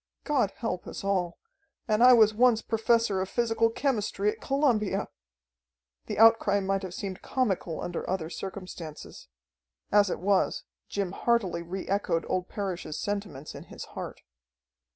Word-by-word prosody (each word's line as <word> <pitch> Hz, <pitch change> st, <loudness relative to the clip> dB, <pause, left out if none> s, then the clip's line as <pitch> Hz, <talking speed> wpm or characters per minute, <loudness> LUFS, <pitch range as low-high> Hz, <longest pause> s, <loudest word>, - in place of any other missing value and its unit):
God 275 Hz, -9 st, +2 dB
help 180 Hz, -6 st, -3 dB
us -, -, -7 dB
all! 185 Hz, -3 st, 0 dB, 0.5 s
And 215 Hz, +2 st, +3 dB
I 250 Hz, -, +9 dB
was 215 Hz, -3 st, +6 dB
once 235 Hz, 0 st, +4 dB
Professor 225 Hz, -3 st, +2 dB
of 190 Hz, -, -3 dB
Physical 230 Hz, -1 st, +2 dB
Chemistry 215 Hz, -5 st, 0 dB
at -, -, -12 dB
Columbia!" 265 Hz, -7 st, +1 dB, 1.0 s
The -, -, -4 dB
outcry 225 Hz, -2 st, +5 dB
might 195 Hz, 0 st, 0 dB
have 185 Hz, -2 st, -6 dB
seemed 195 Hz, -2 st, -5 dB
comical 195 Hz, -10 st, -1 dB
under 175 Hz, -, -4 dB
other 180 Hz, -4 st, -1 dB
circumstances; 180 Hz, -4 st, -8 dB, 0.6 s
as 205 Hz, -1 st, +5 dB
it -, -, -1 dB
was, 195 Hz, +2 st, +1 dB, 0.3 s
Jim 200 Hz, -3 st, -2 dB
heartily 200 Hz, -5 st, 0 dB
re 180 Hz, +3 st, -6 dB
echoed 185 Hz, -4 st, 0 dB
old 185 Hz, 0 st, -1 dB
Parrish's 185 Hz, -6 st, -4 dB
sentiments 200 Hz, -9 st, -4 dB
in -, -, -9 dB
his -, -, -9 dB
heart. -, -, -7 dB
200 Hz, 145 wpm, -28 LUFS, 185-225 Hz, 1.0 s, I